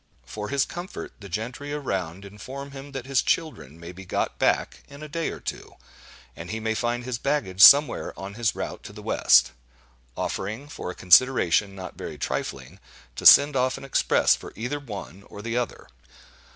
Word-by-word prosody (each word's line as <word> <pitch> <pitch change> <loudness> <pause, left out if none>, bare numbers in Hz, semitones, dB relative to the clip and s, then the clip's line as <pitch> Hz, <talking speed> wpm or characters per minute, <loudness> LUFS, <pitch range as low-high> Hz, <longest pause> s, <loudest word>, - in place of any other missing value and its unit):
For 105 - -6
his 140 0 +1
comfort, 175 +2 -8
the 100 -1 -11
gentry 120 +9 -5
around 95 - -4
inform 130 +8 -9
him 140 +1 -10
that 135 -2 -6
his 135 -2 +1
children 85 - -2
may 85 +1 -9
be 95 +2 -11
got 95 - -3
back - - 0
in 140 +2 -12
a - - -7
day 165 +2 -3
or - - -7
two, - - -7 0.6
and 85 - -9
he 110 - -3
may 110 0 -1
find 120 +2 -2
his 125 -1 -4
baggage 140 -10 -1
somewhere 145 +6 +7
on 95 +1 -7
his 115 0 -1
route - - -5
to - - -9
the - - -11
west—offering, 65 - -1
for 90 - -7
a 90 - -6
consideration 100 -2 +4
not 95 -1 -9
very - - -7
trifling, 70 +7 -5 0.4
to - - +4
send 145 0 +8
off 130 0 +1
an - - -11
express 135 - +3
for - - -11
either 125 +6 -4
one 100 - -9
or 105 - -10
the 115 +1 -3
other. 120 -1 -3
110 Hz, 180 wpm, -25 LUFS, 90-135 Hz, 0.6 s, send